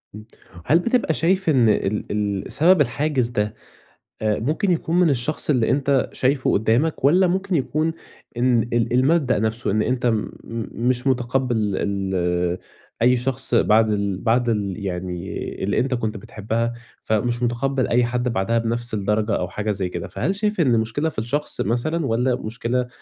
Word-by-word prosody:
إمم. 105 Hz, 0 st, -10 dB, 0.4 s
هل 165 Hz, -, +4 dB
بتبقى 235 Hz, -3 st, +1 dB
شايف 185 Hz, +2 st, +1 dB
إن 125 Hz, -6 st, +4 dB
ال 105 Hz, 0 st, 0 dB, 0.4 s
ال -, -, -9 dB
سبب 175 Hz, +1 st, +4 dB
الحاجز 135 Hz, 0 st, 0 dB
ده، 105 Hz, -3 st, -2 dB, 0.7 s
أ 105 Hz, -1 st, +1 dB
ممكن 155 Hz, -, 0 dB
يكون 170 Hz, 0 st, +1 dB
من 175 Hz, -3 st, +4 dB
الشخص 140 Hz, +4 st, -1 dB
اللي 125 Hz, -6 st, +2 dB
أنت 140 Hz, -1 st, +2 dB
شايفه 130 Hz, +1 st, +1 dB
قدّامك، 120 Hz, +9 st, +1 dB
والّا 180 Hz, +7 st, +5 dB
ممكن 190 Hz, +2 st, -1 dB
يكون 155 Hz, +3 st, 0 dB, 0.4 s
إن 120 Hz, -1 st, +3 dB
ال 120 Hz, 0 st, +1 dB
المبدأ 130 Hz, -1 st, +3 dB
نفسه. 110 Hz, +1 st, -1 dB
إن 105 Hz, +2 st, +1 dB
أنت 125 Hz, 0 st, -1 dB
م 110 Hz, -3 st, 0 dB, 0.6 s
مش 125 Hz, +1 st, 0 dB
مُتقبّل 125 Hz, -1 st, +1 dB, 0.2 s
ال 90 Hz, -3 st, -1 dB, 0.4 s
أي 125 Hz, +2 st, +5 dB
شخص 130 Hz, +1 st, -1 dB
بعد 110 Hz, +1 st, +4 dB
ال 100 Hz, -2 st, -1 dB
بعد 120 Hz, +2 st, +1 dB
ال 100 Hz, -4 st, -1 dB
يعني 90 Hz, -1 st, -4 dB, 0.3 s
اللي 100 Hz, -, 0 dB
أنت 130 Hz, +1 st, 0 dB
كنت 110 Hz, -3 st, -2 dB
بتحبّها، 110 Hz, +4 st, -3 dB, 0.3 s
فمش 120 Hz, +3 st, -1 dB
مُتقبّل 130 Hz, +2 st, 0 dB
أي 120 Hz, +1 st, +3 dB
حد 125 Hz, +1 st, -1 dB
بعدها 115 Hz, +3 st, +1 dB
بنفس 115 Hz, +1 st, -2 dB
الدرجة، 105 Hz, +1 st, 0 dB
أو 90 Hz, -, -2 dB
حاجة 105 Hz, +3 st, -3 dB
زي 95 Hz, -3 st, -2 dB
كده؟ 85 Hz, -1 st, -5 dB
فهل 190 Hz, -, -2 dB
شايف 210 Hz, -1 st, -1 dB
إن 130 Hz, -7 st, +3 dB
المشكلة 115 Hz, +8 st, 0 dB
في 145 Hz, -, -9 dB
الشخص 140 Hz, +7 st, -1 dB
مثلًا، 140 Hz, -, -1 dB
والّا 125 Hz, +3 st, +1 dB
مشكلة 120 Hz, +2 st, -2 dB
120 Hz, 165 wpm, -22 LUFS, 110-140 Hz, 0.7 s, والّا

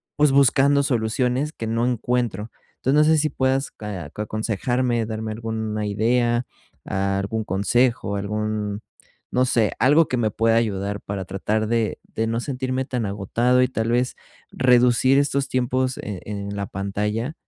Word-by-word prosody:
pues, 150 Hz, -2 st, +4 dB
buscando 140 Hz, +1 st, +4 dB
soluciones 125 Hz, +3 st, 0 dB
que 115 Hz, -, -5 dB
no 115 Hz, +2 st, 0 dB
encuentro. 120 Hz, -3 st, -1 dB, 0.3 s
Entonces, 135 Hz, +3 st, +1 dB
no 160 Hz, -, +5 dB
sé 155 Hz, -, +3 dB
si 155 Hz, +1 st, +1 dB
puedas 135 Hz, 0 st, 0 dB, 0.4 s
aconsejarme, 115 Hz, +3 st, -1 dB
darme 110 Hz, 0 st, -4 dB
alguna 110 Hz, -1 st, -3 dB
idea, 120 Hz, +3 st, +1 dB, 0.4 s
algún 100 Hz, +3 st, -1 dB
consejo, 105 Hz, +2 st, +1 dB
algún, 105 Hz, +1 st, -2 dB, 0.5 s
no 125 Hz, +1 st, +2 dB
sé, 115 Hz, -4 st, +2 dB
algo 145 Hz, +6 st, +5 dB
que 125 Hz, -, -1 dB
me 110 Hz, -3 st, +1 dB
pueda 115 Hz, 0 st, +2 dB
ayudar 100 Hz, -3 st, -1 dB
para 100 Hz, -2 st, -5 dB
tratar 105 Hz, +3 st, -1 dB
de 115 Hz, -1 st, 0 dB, 0.2 s
de 110 Hz, -, 0 dB
no 115 Hz, +1 st, -1 dB
sentirme 130 Hz, 0 st, -2 dB
tan 125 Hz, -4 st, -2 dB
agotado 115 Hz, +6 st, +1 dB
y 125 Hz, -, +4 dB
tal 115 Hz, -2 st, -2 dB
vez 125 Hz, +1 st, +1 dB, 0.4 s
reducir 125 Hz, +1 st, +4 dB
estos 140 Hz, -1 st, 0 dB
tiempos 130 Hz, +1 st, 0 dB
en 100 Hz, -3 st, -5 dB
en 100 Hz, -1 st, -5 dB
la 100 Hz, 0 st, -2 dB
pantalla. 105 Hz, -, -3 dB
115 Hz, 150 wpm, -23 LUFS, 105-125 Hz, 0.5 s, no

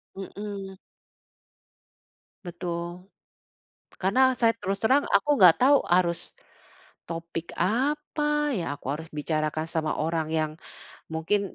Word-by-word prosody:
Mhm. 195 Hz, 0 st, -7 dB, 1.7 s
Betul. 175 Hz, 0 st, -5 dB, 0.9 s
Karena 195 Hz, +7 st, +1 dB, 0.2 s
saya 230 Hz, -2 st, +4 dB
terus 195 Hz, 0 st, -2 dB
terang 265 Hz, +6 st, +4 dB
aku 200 Hz, +8 st, +2 dB
nggak 180 Hz, -3 st, +9 dB
tahu 275 Hz, +3 st, +6 dB, 0.2 s
harus, 175 Hz, -2 st, +2 dB, 0.9 s
topik 165 Hz, 0 st, -5 dB
apa 295 Hz, +5 st, 0 dB
ya, 175 Hz, -, -2 dB
aku -, -, -15 dB
harus 160 Hz, +2 st, -8 dB
bicarakan 155 Hz, +1 st, -1 dB
sama 155 Hz, -1 st, -1 dB
orang 160 Hz, 0 st, 0 dB
yang 155 Hz, -1 st, +1 dB, 0.6 s
mungkin 190 Hz, +5 st, -1 dB
180 Hz, 105 wpm, -26 LUFS, 165-210 Hz, 1.7 s, nggak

